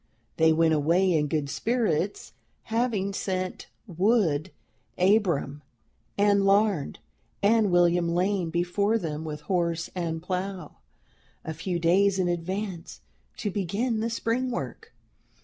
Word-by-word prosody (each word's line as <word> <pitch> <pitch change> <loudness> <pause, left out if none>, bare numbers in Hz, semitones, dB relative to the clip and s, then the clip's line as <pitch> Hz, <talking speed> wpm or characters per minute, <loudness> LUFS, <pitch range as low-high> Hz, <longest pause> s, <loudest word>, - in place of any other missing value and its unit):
They 160 0 +5
went 160 0 +3
away 170 +5 +2
in 150 -2 +1
good 150 -1 -1
spirits, 190 - -1 0.3
having 225 -4 -1
sent 185 -1 -3 0.2
'Wood 185 -4 +1 0.5
Abram' 180 -8 +2 0.6
and 200 0 +3
Larned, 195 -5 +2 0.5
and 215 0 +4
William 175 -1 +3
Lane 180 0 0
before 180 +6 +1
them 160 -6 -4
with 150 -1 -6
horse 170 0 -1
and 165 -3 -3
plow, 180 -1 -5 0.7
a 160 - -4
few 175 +3 -3
days 190 +4 +3
in 185 -2 +1
advance, 175 +1 -4 0.4
to 205 - -3
begin 210 +5 -1
the 225 +1 -1
spring 235 +2 -1
work. 245 - -6
185 Hz, 120 wpm, -26 LUFS, 165-205 Hz, 0.7 s, They